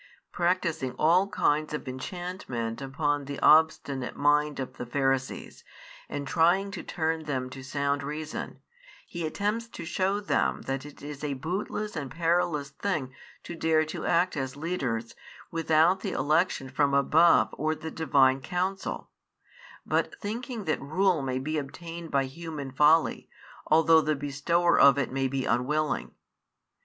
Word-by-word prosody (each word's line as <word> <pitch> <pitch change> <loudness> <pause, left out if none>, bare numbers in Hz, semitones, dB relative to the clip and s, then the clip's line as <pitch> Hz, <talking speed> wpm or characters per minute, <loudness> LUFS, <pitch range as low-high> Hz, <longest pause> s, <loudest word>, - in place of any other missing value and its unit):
Practising 170 -6 0
all 175 +5 +4
kinds 155 -6 0
of 150 - -7
enchantment 130 - -5
upon 145 +1 -1
the 140 0 -6
obstinate 150 -4 +3
mind 150 0 +2
of 130 - -5
the 125 - -5
Pharisees, 135 0 -2 0.5
and 140 -1 -4
trying 180 +7 +3
to 200 - -6
turn 160 -1 -2
them 130 -3 -3
to 135 - -8
sound 140 +1 -1
reason, 150 +2 -6 0.4
He 170 -2 -4
attempts 210 +7 -2
to 230 - -8
show 190 +4 0
them 205 - 0
that 135 +1 -4
it 145 - -14
is 145 0 -7
a 145 -2 -2
bootless 195 +8 -4
and 145 -3 -4
perilous 165 -3 0
thing 140 -5 -3 0.3
to - - -7
dare 160 -1 +2
to - - -5
act 175 +2 +2
as 135 -2 -3
leaders, 135 -9 -3 0.4
without 165 +2 +3
the - - -4
election 150 0 +1
from 140 +1 +1
above 160 +4 +4
or 155 +1 -1
the 160 +1 -7
Divine 135 -4 +3
counsel, 185 +6 -3 0.7
but - - -1
thinking 230 +2 -5
that 155 -4 -1
rule 165 +4 +1
may 130 -1 -2
be 155 +4 -2
obtained 165 +4 -8
by 140 -2 +1
human 145 -1 -7
folly, 150 +4 +3 0.4
although 160 +1 +5
the 155 0 0
Bestower 145 +5 +1
of 140 0 +7
it 140 -4 -1
may 135 0 0
be 130 0 -2
unwilling. 145 +6 0
155 Hz, 150 wpm, -28 LUFS, 135-170 Hz, 0.7 s, of